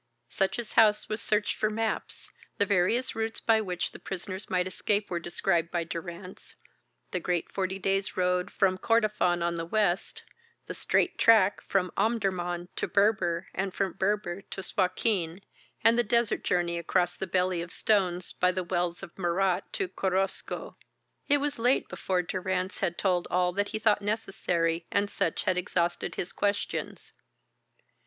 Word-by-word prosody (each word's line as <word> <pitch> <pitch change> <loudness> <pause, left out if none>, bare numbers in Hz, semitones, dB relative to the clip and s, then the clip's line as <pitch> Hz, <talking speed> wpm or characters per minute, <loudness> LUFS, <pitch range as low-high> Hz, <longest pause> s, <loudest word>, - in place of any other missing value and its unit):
Sutch's 210 +4 -1
house 215 -2 +5
was 215 +1 -3
searched 210 -1 0
for 215 - +1
maps, 220 0 -3 0.3
the 205 - +3
various 205 +6 +2
routes 225 0 -2
by 220 -1 +3
which 180 -4 -2
the - - -11
prisoners 190 0 -5
might 180 -1 +1
escape 200 +2 -1
were 175 - 0
described 175 0 0
by 170 -1 -1
Durrance 170 +2 -8 0.6
the 180 - -1
great 175 -1 -1
forty 190 -1 -1
days' 195 0 -1
road 180 +1 +1
from 185 -2 +2
Kordofan 210 -7 +2
on 170 0 0
the 165 - -3
west, 195 -2 0 0.4
the - - -5
straight - - +1
track 215 -4 +5
from 185 -2 0
Omdurman 185 -6 0
to - - -1
Berber 200 -4 +2
and 190 0 -2
from 195 -3 0
Berber 195 -2 -1
to 195 -1 -7
Suakin, 185 -2 0 0.4
and 230 +1 +5
the - - +4
desert 235 0 +1
journey 170 -1 0
across 175 +1 +1
the 190 - -4
Belly 180 -1 +1
of 170 +1 -7
Stones 185 -4 +1
by 180 0 +2
the 185 0 -2
wells 175 0 -1
of 175 - -9
Murat 180 +1 0
to 390 - -1
Korosko. 190 - -2 0.5
It 290 - +5
was 285 -2 -2
late 245 +3 +2
before 185 -1 -1
Durrance 185 +1 -2
had 175 -3 -1
told 180 -3 +1
all 180 0 +2
that 205 +2 0
he - - -3
thought 215 -1 +3
necessary 180 -5 -1
and 200 0 0
Sutch - - -1
had 185 -1 +1
exhausted 175 -1 -1
his 175 - -4
questions. 205 0 -2
190 Hz, 160 wpm, -28 LUFS, 175-210 Hz, 0.6 s, house